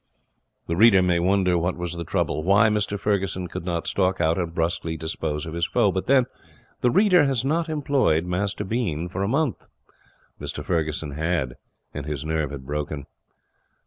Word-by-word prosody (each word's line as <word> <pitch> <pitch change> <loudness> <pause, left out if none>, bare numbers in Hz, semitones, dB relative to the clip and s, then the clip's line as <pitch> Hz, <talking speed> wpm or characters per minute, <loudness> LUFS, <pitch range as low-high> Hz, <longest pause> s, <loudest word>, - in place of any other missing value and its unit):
The 85 - -2
reader 100 -1 +6
may 90 -1 +2
wonder 90 -1 +2
what 90 +2 -1
was 90 -1 -4
the 85 0 -4
trouble 80 - -1
why 100 +6 +4
Mr 105 -1 -1
Ferguson 95 -3 -1
could 85 - -7
not 85 -2 -2
stalk 95 -1 0
out 80 +1 +2
and 85 -2 -2
brusquely 80 -1 -1
dispose 80 -1 -3
of 80 - -6
his 85 +1 0
foe; 100 - +2
but 95 0 -3
then 130 -2 +5 0.5
the 125 - +3
reader 185 - +5
has 135 -2 0
not 165 +3 0
employed 140 - +1
Master 100 +3 -2
Bean 95 -7 -2
for 95 +2 -4
a 100 - +1
month. 140 +2 -1 0.7
Mr - - -5
Ferguson 80 -3 -1
had, 75 -3 -1 0.4
and 75 -1 -6
his 75 -1 -4
nerve 80 -2 -1
had 70 -2 -8
broken. 75 0 -4
90 Hz, 175 wpm, -24 LUFS, 80-105 Hz, 0.7 s, reader